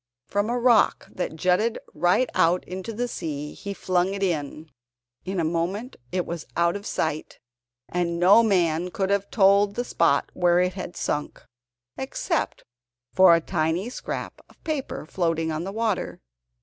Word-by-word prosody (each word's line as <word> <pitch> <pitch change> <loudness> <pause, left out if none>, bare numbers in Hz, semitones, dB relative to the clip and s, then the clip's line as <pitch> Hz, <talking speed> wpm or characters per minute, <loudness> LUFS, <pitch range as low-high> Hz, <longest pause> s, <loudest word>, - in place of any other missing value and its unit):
From 205 +2 -1
a 245 - 0
rock 240 -2 +3
that 180 -3 -4
jutted 185 +7 +1 0.2
right 175 +10 +2
out 175 +2 +2
into 185 +5 -5
the 240 +3 -2
sea 150 -8 -5
he 200 - -7
flung 185 0 0
it 200 - -3
in. 155 -3 -3 0.5
In 190 0 -2
a - - +1
moment 175 +9 -2 0.2
it 180 -1 -1
was 170 -2 -6
out 170 +1 +2
of 205 0 -6
sight, 155 -1 -2 0.5
and 170 -1 -1
no 190 +6 +7
man 180 -5 +1
could 190 +1 -1
have 200 0 0
told 200 -1 +4
the 245 - -2
spot 165 -10 +1
where 175 -1 +3
it 180 0 +1
had 180 -1 -7
sunk, 150 0 -3 0.6
except 275 - -2 0.5
for 185 -3 +7
a 165 - +1
tiny 170 +6 -1
scrap - - -6
of - - -24
paper 300 - -3
floating 165 -1 -1
on 155 +2 -3
the 195 - -4
water. 220 -1 -2
180 Hz, 160 wpm, -25 LUFS, 170-205 Hz, 0.6 s, no